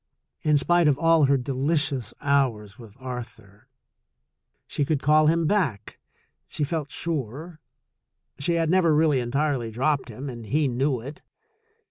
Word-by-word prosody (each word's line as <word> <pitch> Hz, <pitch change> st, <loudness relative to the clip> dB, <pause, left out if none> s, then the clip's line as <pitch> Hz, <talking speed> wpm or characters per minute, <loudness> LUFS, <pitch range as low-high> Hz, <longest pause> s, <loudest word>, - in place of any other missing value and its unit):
In 150 Hz, -1 st, +3 dB
spite 175 Hz, +3 st, +3 dB
of 140 Hz, -2 st, +3 dB
all 165 Hz, -2 st, +4 dB
her 140 Hz, 0 st, +3 dB
delicious 135 Hz, -1 st, -1 dB
hours 125 Hz, -8 st, 0 dB
with 115 Hz, -1 st, -14 dB
Arthur, 115 Hz, -5 st, -9 dB, 1.0 s
she 145 Hz, -, -2 dB
could 145 Hz, 0 st, 0 dB
call 155 Hz, +1 st, +4 dB
him 165 Hz, +1 st, +2 dB
back, 150 Hz, -, -1 dB, 0.5 s
she 150 Hz, -, -4 dB
felt 150 Hz, -1 st, -3 dB
sure. 155 Hz, +2 st, -4 dB, 0.8 s
She 170 Hz, +5 st, 0 dB
had 165 Hz, -1 st, +1 dB
never 175 Hz, -4 st, +3 dB
really 150 Hz, -3 st, +3 dB
entirely 130 Hz, 0 st, -1 dB
dropped 130 Hz, +4 st, -1 dB
him, 125 Hz, +5 st, -7 dB
and 120 Hz, -4 st, -8 dB
he 150 Hz, +6 st, +1 dB
knew 130 Hz, 0 st, -1 dB
it. 140 Hz, +5 st, -9 dB
140 Hz, 140 wpm, -25 LUFS, 125-155 Hz, 1.0 s, all